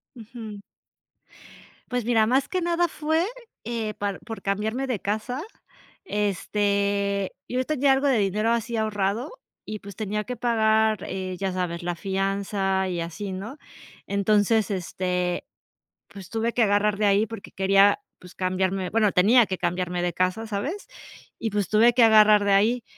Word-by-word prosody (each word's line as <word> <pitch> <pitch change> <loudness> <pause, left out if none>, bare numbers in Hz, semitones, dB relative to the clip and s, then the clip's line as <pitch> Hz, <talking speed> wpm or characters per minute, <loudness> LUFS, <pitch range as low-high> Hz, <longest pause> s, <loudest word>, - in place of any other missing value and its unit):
Ujú. 220 -3 -9 1.3
Pues 250 -2 -1
mira, 225 -2 +3
más 260 +4 +1
que 370 -1 -1
nada 345 0 +1
fue, 315 +2 0 0.4
eh, 225 -2 -3
par 200 -2 -3
por 225 -1 -8
cambiarme 220 +7 -2
de 235 -7 -2
casa, 220 - -3 0.6
este, 200 - 0
yo 255 +1 -1
tenía 280 -3 +3
algo 275 +2 +1
de 260 -4 +3
dinero 210 +3 +1
así 235 0 -1
ahorrado 215 +3 -1 0.3
y 215 -1 -6
pues 200 -1 -11
tenía 210 0 -2
que 250 +2 -5
pagar, 220 -3 +2
eh, 185 -1 -4
ya 195 0 -2
sabes, 175 -2 -3
la 175 0 -2
fianza 195 0 -1
y 175 -2 -2
así, 185 +4 -5
¿no? 215 +10 -7 0.5
Entonces, 205 +2 +2
este, 180 -1 -2 0.6
pues 195 -3 -12
tuve 230 +1 -1
que 240 - +3
agarrar 205 0 +2
de 210 0 +1
ahí 200 +2 +3
porque 225 -2 -9
quería, 195 - +4 0.2
pues, 180 0 -14
cambiarme, 185 0 -1
bueno, 215 -3 +2
tenía 225 +7 +5
que 185 - -4
cambiarme 180 0 -2
de 175 -1 -1
casa, 185 +5 0
¿sabes? 270 - -4 0.5
Y 225 - -2
pues 205 -3 -1
tuve 225 +3 +5
que 240 -1 +5
agarrar 215 -2 +6
de 200 - +2
ahí 225 +4 +3
210 Hz, 155 wpm, -25 LUFS, 195-230 Hz, 1.3 s, agarrar